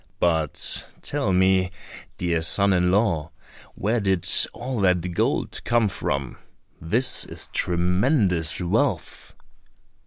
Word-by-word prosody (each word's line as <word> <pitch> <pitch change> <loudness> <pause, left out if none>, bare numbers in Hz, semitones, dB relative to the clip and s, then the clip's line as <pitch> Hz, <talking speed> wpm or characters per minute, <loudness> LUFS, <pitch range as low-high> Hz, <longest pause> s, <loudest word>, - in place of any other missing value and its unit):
But 80 -4 +2 0.2
tell - - -1
me, 95 0 +3 0.5
dear 85 -2 -1
son 100 +4 +3
in 90 -1 +2
law, 90 -6 +1 0.5
where 110 +4 -1
did 95 -4 0 0.2
all 125 -2 -5
that 90 -2 +1
gold - - -1
come 120 -2 +2
from? 70 -6 -4 0.4
this 120 +10 +1
is - - -7
tremendous 90 - +1
wealth!" 90 -1 -2
90 Hz, 105 wpm, -23 LUFS, 85-100 Hz, 0.5 s, me